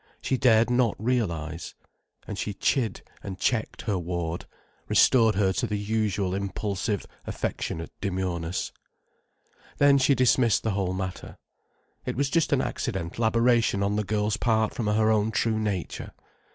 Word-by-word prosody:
She 130 Hz, -, 0 dB
dared 120 Hz, -2 st, +4 dB
not 120 Hz, -3 st, +2 dB
realize. 85 Hz, -9 st, -2 dB, 0.5 s
And -, -, -5 dB
she 105 Hz, -, -3 dB
chid 115 Hz, -1 st, 0 dB, 0.2 s
and 95 Hz, -2 st, -6 dB
checked 110 Hz, +3 st, -1 dB
her 100 Hz, -4 st, -1 dB
ward, 85 Hz, -1 st, -3 dB, 0.4 s
restored 115 Hz, -4 st, +5 dB
her 95 Hz, -1 st, +2 dB
to 95 Hz, -, -1 dB
the 105 Hz, -, -2 dB
usual 100 Hz, -2 st, -1 dB
impulsive, 100 Hz, 0 st, -2 dB, 0.2 s
affectionate 80 Hz, 0 st, -3 dB
demureness. 90 Hz, -3 st, -2 dB, 1.1 s
Then 140 Hz, -1 st, +5 dB
she 135 Hz, +1 st, +4 dB
dismissed 125 Hz, -2 st, +3 dB
the 110 Hz, -, 0 dB
whole 95 Hz, -2 st, -1 dB
matter. 95 Hz, -1 st, -5 dB, 0.7 s
It -, -, -3 dB
was 135 Hz, +2 st, 0 dB
just 165 Hz, -2 st, +2 dB
an -, -, +3 dB
accidental 85 Hz, +8 st, -2 dB
aberration 115 Hz, -3 st, +3 dB
on 100 Hz, +1 st, 0 dB
the 105 Hz, -, 0 dB
girl's 105 Hz, +1 st, 0 dB
part 110 Hz, -2 st, +1 dB
from 115 Hz, -, -3 dB
her 110 Hz, +1 st, +3 dB
own 110 Hz, 0 st, +2 dB
true 110 Hz, 0 st, 0 dB
nature. 100 Hz, -5 st, -3 dB
105 Hz, 145 wpm, -26 LUFS, 95-115 Hz, 1.1 s, restored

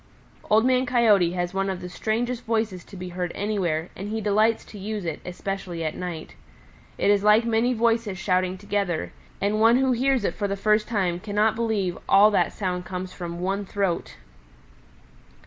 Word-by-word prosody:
"Old 220 Hz, +2 st, +4 dB
Man 255 Hz, 0 st, +2 dB
Coyote 210 Hz, -8 st, +4 dB
has 175 Hz, 0 st, -2 dB
one 195 Hz, 0 st, 0 dB
of 190 Hz, -2 st, -3 dB
the 180 Hz, -, -7 dB
strangest 230 Hz, +6 st, -2 dB
voices 220 Hz, -5 st, -1 dB
to 195 Hz, -, -12 dB
be 180 Hz, 0 st, -6 dB
heard 180 Hz, 0 st, -3 dB
anywhere, 185 Hz, -6 st, -1 dB
and 200 Hz, +2 st, -6 dB
he 220 Hz, +1 st, -2 dB
delights 215 Hz, +2 st, +2 dB
to 210 Hz, -, -11 dB
use 205 Hz, -1 st, -4 dB
it, 165 Hz, -, -3 dB
especially 180 Hz, -2 st, -5 dB
at 155 Hz, -, -2 dB
night. 175 Hz, -3 st, -6 dB, 0.6 s
It 205 Hz, -, +3 dB
is 205 Hz, -1 st, +3 dB
like 210 Hz, +2 st, +5 dB
many 230 Hz, +2 st, +2 dB
voices 230 Hz, -3 st, +1 dB
shouting 185 Hz, 0 st, 0 dB
together, 195 Hz, -, -2 dB, 0.3 s
and 210 Hz, +2 st, 0 dB
one 230 Hz, +2 st, +6 dB
who 265 Hz, 0 st, +2 dB
hears 255 Hz, 0 st, +2 dB
it -, -, 0 dB
for 205 Hz, -, -2 dB
the 200 Hz, 0 st, -3 dB
first 210 Hz, +1 st, +2 dB
time 185 Hz, -6 st, 0 dB
cannot 210 Hz, +2 st, +1 dB
believe 220 Hz, -6 st, 0 dB
that -, -, -13 dB
all 210 Hz, +2 st, +7 dB
that 205 Hz, -, +2 dB
sound 180 Hz, -3 st, -3 dB
comes 185 Hz, 0 st, -6 dB
from 170 Hz, -1 st, -6 dB
one 195 Hz, +2 st, -1 dB
throat. 185 Hz, -, -2 dB
200 Hz, 185 wpm, -25 LUFS, 180-220 Hz, 0.6 s, all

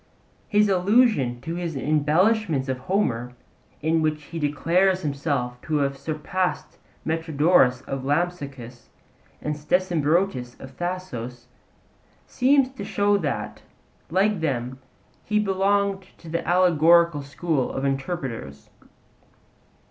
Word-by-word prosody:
His 210 Hz, 0 st, +3 dB
allusion 190 Hz, -, +2 dB
to 165 Hz, -, -5 dB
his 170 Hz, -2 st, -4 dB
embellishments 155 Hz, -, +2 dB
of 130 Hz, -1 st, -2 dB
Homer, 125 Hz, -, -1 dB, 0.5 s
in 160 Hz, +1 st, +2 dB
which 155 Hz, -1 st, -1 dB
he 165 Hz, +2 st, -7 dB
declares 175 Hz, +6 st, +1 dB
himself 140 Hz, -4 st, -2 dB
to 155 Hz, -, -3 dB
have 140 Hz, -1 st, +1 dB
surpassed 160 Hz, +5 st, -3 dB, 0.3 s
Metrodorus 160 Hz, -4 st, +2 dB
of 135 Hz, -1 st, -5 dB
Lampsacus 140 Hz, -6 st, -3 dB, 0.5 s
and 150 Hz, 0 st, -2 dB
Stesimbrotus 165 Hz, -4 st, 0 dB
of 130 Hz, 0 st, -11 dB
Thasos, 125 Hz, -10 st, -5 dB, 0.8 s
seems 265 Hz, +1 st, +3 dB
to 260 Hz, -6 st, -8 dB
show 205 Hz, 0 st, +1 dB
that, 105 Hz, -, -3 dB, 0.5 s
like 195 Hz, +3 st, +2 dB
them, 130 Hz, -4 st, -2 dB, 0.4 s
he 210 Hz, -, 0 dB
belonged 200 Hz, -1 st, +1 dB, 0.2 s
to 165 Hz, -, -12 dB
the 170 Hz, +1 st, -2 dB
allegorical 170 Hz, -3 st, +4 dB
school 140 Hz, 0 st, -2 dB
of 135 Hz, -, -3 dB
interpreters. 135 Hz, -, -4 dB
160 Hz, 110 wpm, -24 LUFS, 135-185 Hz, 0.8 s, allegorical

